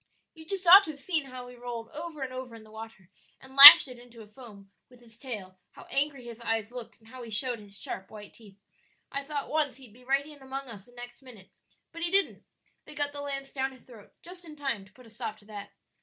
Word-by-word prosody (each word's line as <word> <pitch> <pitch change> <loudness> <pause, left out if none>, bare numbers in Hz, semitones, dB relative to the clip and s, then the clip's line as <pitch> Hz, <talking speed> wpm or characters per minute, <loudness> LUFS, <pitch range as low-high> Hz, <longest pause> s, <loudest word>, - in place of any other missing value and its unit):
You 320 -1 -15
just 385 0 -3
ought 380 +4 +9
to - - -9
have 290 -2 -9
seen 315 -1 0
how 255 -2 -11
he 250 - -13
rolled 240 -2 -8
over 310 -2 -8
and 255 -1 -7
over 255 -2 -9
in 225 - -14
the 215 - -19
water 220 -4 -13 0.3
and 265 0 -17
lashed 280 +1 +12
it 250 -2 -12
into 240 -2 -15
a - - -18
foam 210 -4 -16 0.2
with 250 -1 -20
his 230 -2 -14
tail, 210 -7 -9
how - - -14
angry 275 -1 -2
his 235 -1 -11
eyes 225 -1 -3
looked, 245 -2 -11
and 220 0 -23
how 255 +1 -12
he 235 - -10
showed 235 +2 -2
his 200 -1 -9
sharp 190 - -5
white 210 -1 -13
teeth. 205 -4 -19 0.5
I 280 0 -5
thought 285 0 -6
once 300 -3 -2
he'd 255 -6 -17
be 250 +2 -20
right 275 +2 -1
in 295 -2 -15
among 265 0 -7
us 205 -4 -11
the 245 - -22
next 245 0 -12
minute, 230 -8 -16 0.4
but 335 - -11
he 340 - 0
didn't; 390 +2 +2 0.4
they - - -14
got 290 -1 -2
the 290 0 -9
lance 275 -1 -7
down 265 -1 -3
his 255 - -19
throat 230 -5 -17
just 360 +1 -13
in 315 -3 -13
time 270 -9 -5
to 205 - -23
put 255 - -19
a - - -17
stop 220 -1 -7
to 210 - -23
that." 205 -1 -10
250 Hz, 255 wpm, -27 LUFS, 225-280 Hz, 0.5 s, lashed